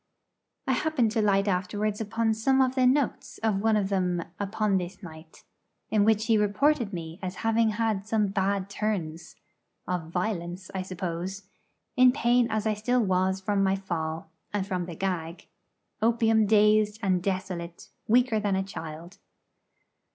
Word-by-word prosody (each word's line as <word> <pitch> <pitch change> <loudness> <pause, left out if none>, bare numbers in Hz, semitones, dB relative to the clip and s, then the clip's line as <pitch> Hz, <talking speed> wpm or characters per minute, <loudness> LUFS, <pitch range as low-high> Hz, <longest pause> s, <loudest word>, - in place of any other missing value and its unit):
I - - 0
happened 260 -4 +1
to 225 0 +1
light 200 -1 +2
afterwards 205 +3 -1
upon 225 +1 0
the 260 +3 +2
'notes' 285 -1 -2
of 210 -3 +1
one 220 0 +3
of 195 -2 0
them 180 -3 0 0.2
upon 205 0 0
this 180 +3 -7
night, 160 -1 -12 0.5
in 210 -2 +3
which 220 0 +3
he 225 -2 +3
reported 235 +3 +2
me 165 -1 -7
as 185 -1 -4
having 225 0 +3
had 215 -2 -1
some 210 -2 +1
'bad 195 0 0
turns' 190 -6 -3 0.5
of 180 -3 -3
violence, 180 -1 -3
I 190 - -2
suppose 185 +1 -5 0.5
in 255 -2 +6
pain 245 -2 +2
as 220 -1 -1
I 215 - +2
still 245 +4 +1
was 190 0 +1
from 200 0 +1
my 190 0 +2
fall, 160 -4 -4 0.2
and 205 -2 -1
from 180 -3 -3
the 170 - -7
gag; 170 -2 -3 0.6
opium 225 -1 +3
dazed 210 0 +4
and 185 -2 +2
desolate, 185 -3 -4 0.2
weaker 240 0 +3
than 205 -2 0
a 190 - 0
child. 165 -1 -8
200 Hz, 150 wpm, -27 LUFS, 185-220 Hz, 0.6 s, in